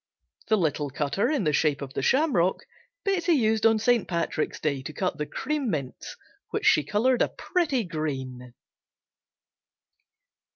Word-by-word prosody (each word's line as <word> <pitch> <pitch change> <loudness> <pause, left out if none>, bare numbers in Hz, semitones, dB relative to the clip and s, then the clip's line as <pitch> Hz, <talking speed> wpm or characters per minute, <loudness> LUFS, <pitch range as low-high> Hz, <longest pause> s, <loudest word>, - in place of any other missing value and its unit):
The 220 - +3
little 150 -5 0
cutter 145 +8 -1
in 295 -8 0
the 150 -3 +1
shape 145 -1 +2
of 135 -1 -7
the - - -2
shamrock 235 - +2 0.4
Betsey 375 -4 +1
used 220 -5 +3
on 225 0 +3
St. 230 0 +2
Patrick's 170 -3 -2
Day 140 -3 -1
to 155 +3 -7
cut 180 +1 -2
the 150 - -2
"Cream 290 -3 -2
Mints," 140 -8 -5 0.3
which - - -3
she 150 - +5
colored 235 - +1
a - - +3
pretty 295 - -1
green. 130 - -5
180 Hz, 150 wpm, -26 LUFS, 145-245 Hz, 0.4 s, she